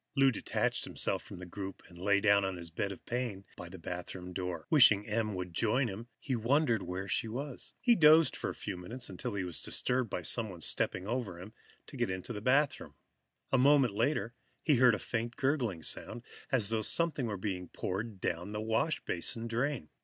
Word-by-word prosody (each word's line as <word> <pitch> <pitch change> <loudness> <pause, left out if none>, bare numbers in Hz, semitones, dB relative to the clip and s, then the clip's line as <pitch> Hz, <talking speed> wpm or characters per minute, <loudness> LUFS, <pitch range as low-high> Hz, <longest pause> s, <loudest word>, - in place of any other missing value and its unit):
Lou 135 -1 +5
detached 115 - -1
himself - - 0
from - - -10
the 90 - -8
group 95 +2 -7
and 90 - -16
lay 100 +2 +3
down 100 -1 +4
on 95 -1 -2
his 85 -1 -6
bed 100 +4 -2
of 95 - -10
pain 115 -6 -3
by 90 - -9
the 95 - -9
bathroom 90 +1 -6
door. 90 -3 -4
Wishing 110 -9 +7
Em 110 -1 -1
would 90 -1 -5
join 120 +6 +1
him, 110 +4 -7
he 130 - -2
wondered 120 0 +2
where 95 +2 -4
she 115 - 0
was. 130 +4 -6
He 245 -1 +5
dozed 160 -4 +6
for - - -3
a - - -6
few 100 - -5
moments, 120 +8 -6
until 100 +4 -4
he 100 - -1
was 90 -3 -2
disturbed 125 -2 +1
by 90 - -3
someone 100 -4 +1
stepping 90 - 0
over 110 -6 -3
him 100 +5 -10 0.3
to - - -10
get - - 0
into 95 +5 -4
the 105 - -5
bathroom. 135 +5 +1 0.6
A 135 - +4
moment 135 -4 +5
later, 115 0 0 0.3
he 150 -5 +4
heard 125 -2 +6
a - - -3
faint 115 +2 -3
gurgling 125 - 0
sound, 115 +9 -2 0.3
as 115 -7 +3
though 110 -1 0
something 150 +1 +1
were 105 -2 -3
being 95 -2 -3
poured 100 +4 -4
down 90 +4 -3
the 105 - -2
washbasin 110 - 0
drain. 120 - -2
110 Hz, 200 wpm, -32 LUFS, 95-125 Hz, 0.6 s, Wishing